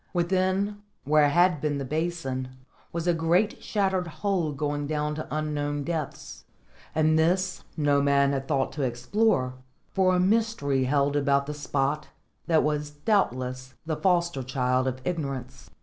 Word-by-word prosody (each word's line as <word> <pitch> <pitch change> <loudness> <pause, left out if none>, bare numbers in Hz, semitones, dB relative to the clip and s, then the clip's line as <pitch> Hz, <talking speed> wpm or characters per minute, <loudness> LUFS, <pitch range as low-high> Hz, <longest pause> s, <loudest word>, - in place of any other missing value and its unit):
Within, 190 +3 0 0.2
where 150 +1 +4
had 175 0 +3
been 150 -2 0
the 140 - -3
basin, 135 -4 -3 0.3
was 170 0 -3
a 175 - +3
great 170 +6 +1
shattered 190 -4 0
hole 175 -2 -1
going 145 0 -2
down 150 0 -1
to 155 +1 -5
unknown 145 -1 -2
depths; 160 -2 -5 0.5
and 155 0 +3
this 185 +3 +1
no 145 -2 +3
man 140 0 +3
had 135 0 -3
thought 135 -3 0
to 150 - -5
explore, 130 - +1 0.4
for 185 -1 +3
a - - +2
mystery 185 - +1
held 140 +1 +1
about 140 -1 +2
the 150 - -4
spot 145 +1 -1 0.4
that 160 -2 +4
was 150 -1 -1
doubtless 130 - -1
the 160 -1 -1
foster 170 -5 +1
child 125 0 0
of 130 0 -2
ignorance. 135 -6 -4
150 Hz, 150 wpm, -27 LUFS, 140-175 Hz, 0.5 s, where